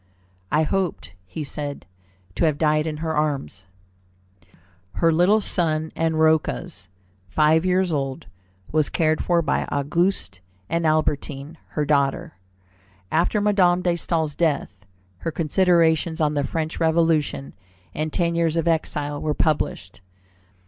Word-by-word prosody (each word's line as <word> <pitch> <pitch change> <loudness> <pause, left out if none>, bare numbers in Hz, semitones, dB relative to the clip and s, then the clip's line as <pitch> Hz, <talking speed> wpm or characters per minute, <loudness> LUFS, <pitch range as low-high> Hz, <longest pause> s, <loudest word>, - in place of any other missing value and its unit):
"I 155 - +3
hoped," 180 - -2
he 155 - -5
said, 145 0 -6 0.5
"to 95 - +1
have 155 -3 +1
died 155 0 +2
in 155 -1 -3
her 160 - -1
arms." 135 - -2 1.3
Her 165 +7 +2
little 185 +6 +4
son, 160 -4 0
and 160 -1 0
Rocca's, 160 - +1 0.4
five 155 - +3
years 185 -1 +2
old, 135 -2 -3 0.5
was 155 -1 +1
cared 155 -1 +1
for 170 -1 +2
by 150 - 0
Auguste 145 - -1 0.3
and 165 -1 0
Albertine, 155 0 -1
her 150 - 0
daughter. 140 -2 0 0.8
After 170 +6 +2
Madame 185 -4 +3
de 175 - +2
Staël's 160 -3 -1
death, 140 - -2 0.3
her - - -3
Considerations 165 0 +2
on 150 -1 +2
the 145 -1 0
French 160 +1 -3
Revolution 160 -4 +1 0.4
and 155 0 -3
Ten 170 0 0
Years 165 -1 +1
of 165 0 0
Exile 150 -3 -1
were 150 -1 -1
published. 105 - -1
155 Hz, 130 wpm, -23 LUFS, 150-170 Hz, 1.3 s, little